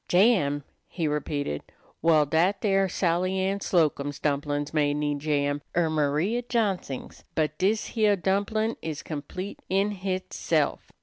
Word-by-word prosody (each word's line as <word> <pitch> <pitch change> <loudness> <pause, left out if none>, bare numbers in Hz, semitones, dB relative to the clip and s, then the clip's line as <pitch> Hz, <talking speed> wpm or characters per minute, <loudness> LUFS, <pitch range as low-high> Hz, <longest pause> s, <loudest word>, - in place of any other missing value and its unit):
"Jam!" 175 -8 +3 0.2
he 165 -3 -2
repeated. 145 - -2 0.4
"Well, 155 -2 +5
dat 170 +7 +2
dere 195 -2 +2
Sally 180 +1 +1
Ann 195 +1 0
Slocum's 145 -6 +1
dumplin's 145 0 -1
may 145 -2 +2
need 145 -1 -1
jam, 145 -1 0 0.2
er 165 -2 +3
Maria 155 +10 +1
Johnsing's, 205 - -2
but 155 -1 +1
dis 210 +3 +1
heah 215 -3 +3
dumplin' 205 +4 0
is 155 -2 -5
complete 165 +6 -6
in 195 +2 +2
hitself. 185 -1 -1
170 Hz, 130 wpm, -27 LUFS, 145-195 Hz, 0.4 s, Well